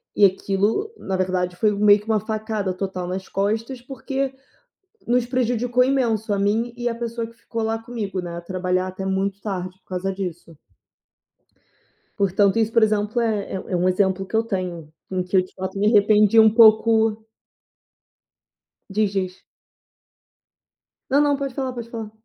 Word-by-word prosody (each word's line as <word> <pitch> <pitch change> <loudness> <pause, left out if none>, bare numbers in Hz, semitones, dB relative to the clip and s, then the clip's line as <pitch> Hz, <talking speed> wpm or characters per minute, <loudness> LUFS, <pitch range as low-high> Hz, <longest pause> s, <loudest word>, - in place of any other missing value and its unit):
e 205 - +2
aquilo, 200 - 0
na 190 - -3
verdade, 180 -1 -1
foi 215 +3 +2
meio 205 0 +5
que 210 - -15
uma 220 -1 +1
facada 215 -2 -3
total 185 -1 -4
nas 185 +1 -4
costas 225 +6 -2
porque 270 +1 -3 0.8
nos 245 0 +2
prejudicou 245 0 +1
imenso 235 -5 0
a - - -1
mim 220 +4 0
e 240 0 -5
a 235 - -3
pessoa 230 0 -4
que 230 - -15
ficou 230 0 -5
lá 225 0 -1
comigo, 225 -5 -4
né, 175 -1 -6
a - - -5
trabalhar 185 +1 -1
até 185 +1 -6
muito 195 +1 -1
tarde 185 -3 -5
por - - -49
causa 190 +1 -2
disso. 175 -3 -6 1.6
Portanto 200 +1 +2
isso, 225 -1 +1
por 230 - +4
exemplo, 215 +2 +1
é 215 -4 -1 0.2
é - - +1
um 180 +1 +1
exemplo 190 0 +1
que 205 - -6
eu 225 - +3
tenho, 180 -7 -4 0.2
em 185 -1 -1
que 185 +1 0
eu - - +6
de, 185 - -16
fato, 190 +1 -5
me 205 - +1
arrependi 210 0 +5
um 220 0 +8
pouco. 220 0 +4 1.6
Diz, 205 0 0
diz. 185 -1 -3 1.7
Não, 275 +2 +4
não, 290 -1 +3
pode 275 -2 -4
falar, 265 -1 -3
pode 235 -1 -7
falar. 225 -2 -6
210 Hz, 165 wpm, -22 LUFS, 190-230 Hz, 1.7 s, um